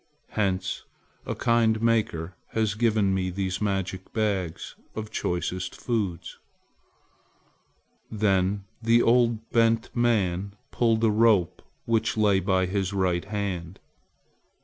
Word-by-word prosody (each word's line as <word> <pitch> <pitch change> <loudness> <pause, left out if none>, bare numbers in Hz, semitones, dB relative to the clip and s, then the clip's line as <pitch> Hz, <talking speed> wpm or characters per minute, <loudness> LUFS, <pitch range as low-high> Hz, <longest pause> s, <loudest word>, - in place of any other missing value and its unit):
Hence 95 -3 -1 0.4
a - - -2
kind 115 -2 +2
Maker 110 -7 0 0.2
has 110 -2 +1
given 105 -3 +2
me 95 -1 0
these 95 +1 -3
magic 95 -2 -2
bags 100 -7 -2 0.2
of 110 -1 -5
choicest 90 +1 -2
foods." 105 -8 -3 1.7
Then 100 -2 +1 0.2
the 115 +1 +4
old, 115 -2 +2
bent 115 +1 +2
man 100 -5 +1 0.2
pulled 115 -2 +1
at - - +5
a - - +3
rope 105 -5 +3 0.2
which 115 -1 0
lay 105 -3 +4
by 95 0 +1
his 95 +1 -2
right 90 -2 0
hand. 95 -4 -4
100 Hz, 115 wpm, -26 LUFS, 95-115 Hz, 1.7 s, at